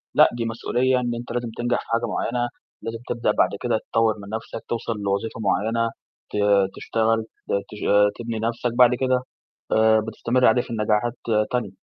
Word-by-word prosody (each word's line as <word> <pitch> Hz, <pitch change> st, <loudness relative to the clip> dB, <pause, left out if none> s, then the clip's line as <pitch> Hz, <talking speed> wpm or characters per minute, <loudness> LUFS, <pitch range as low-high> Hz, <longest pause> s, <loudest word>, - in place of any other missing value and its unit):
لأ، -, -, +7 dB
دي 115 Hz, -, -1 dB
مسؤولية 125 Hz, +3 st, +1 dB
إن 120 Hz, -1 st, -2 dB
أنت 120 Hz, 0 st, -7 dB
لازم 120 Hz, -1 st, -2 dB
تنجح 120 Hz, 0 st, +1 dB
في -, -, -17 dB
حاجة 115 Hz, +1 st, 0 dB
معيّنة، 120 Hz, +3 st, -1 dB, 0.3 s
لازم 115 Hz, 0 st, -5 dB
تبدأ 115 Hz, -3 st, +1 dB
بعد -, -, +3 dB
كده 120 Hz, -3 st, +1 dB
تطوّر 115 Hz, -1 st, +3 dB
من 100 Hz, 0 st, -10 dB
نَفْسك، 110 Hz, 0 st, -5 dB
توصل 115 Hz, 0 st, -2 dB
لوظيفة 100 Hz, +3 st, -2 dB
معيّنة، 110 Hz, +3 st, +1 dB, 0.4 s
ت -, -, -1 dB, 0.4 s
تشتغل، 115 Hz, 0 st, +1 dB, 0.3 s
ت -, -, -2 dB, 0.2 s
تش 105 Hz, -, -8 dB, 0.4 s
تبني 115 Hz, -1 st, -3 dB
نَفْسك، 115 Hz, +2 st, -1 dB
بعد 125 Hz, 0 st, +6 dB
كده 130 Hz, 0 st, +1 dB, 0.5 s
آآ 110 Hz, 0 st, +5 dB
بتستمر 115 Hz, +3 st, 0 dB
عليه 115 Hz, +2 st, +5 dB
في -, -, -12 dB
النجاحات 110 Hz, +1 st, +1 dB, 0.4 s
تانية. 120 Hz, -6 st, -1 dB
115 Hz, 175 wpm, -23 LUFS, 110-120 Hz, 0.5 s, لأ